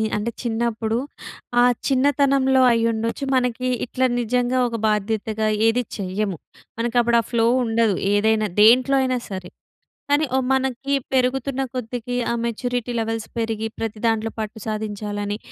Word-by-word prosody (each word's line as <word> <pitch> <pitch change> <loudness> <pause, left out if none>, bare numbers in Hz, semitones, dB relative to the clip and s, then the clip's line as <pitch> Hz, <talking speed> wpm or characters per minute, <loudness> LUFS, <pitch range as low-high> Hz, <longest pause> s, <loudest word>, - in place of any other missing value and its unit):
అంటే 210 +3 -2
చిన్నప్పుడు 225 -1 -1 0.6
ఆ - - +6 0.2
చిన్నతనంలో 270 -1 +3
అయ్యుండొచ్చు 230 +2 0
మనకి 250 0 0 0.2
ఇట్లా 255 +1 0
నిజంగా 245 +2 0
ఒక 230 - -4
బాధ్యతగా 215 +1 -1 0.2
ఏది 240 +2 +2
చెయ్యము. 195 -1 -2 0.4
మనకి 235 +1 -1
అప్పుడు 235 0 +3
ఆ - - -12
ఫ్లో 230 -2 +2 0.2
ఉండదు. 225 -3 +2 0.2
ఏదైనా, 215 +1 +2
దేంట్లో 250 +5 +6
అయినా 255 -1 +1
సరే. 185 -2 -6 0.6
కానీ 290 +2 +3
ఓహ్! 265 -1 +1
మనకి 265 +1 -1 0.2
పెరుగుతున్న 265 +1 +1
కొద్దీకి 245 0 -4 0.2
ఆ - - 0
మెచ్యూరిటీ 245 +1 -2
లెవెల్స్ 225 0 -3
పెరిగి 225 -1 -1
ప్రతి 225 -1 -4
దాంట్లో 225 -1 +1
పట్టు 215 0 -4
సాధించాలని, 210 -1 -3
230 Hz, 130 wpm, -22 LUFS, 220-250 Hz, 0.6 s, ఆ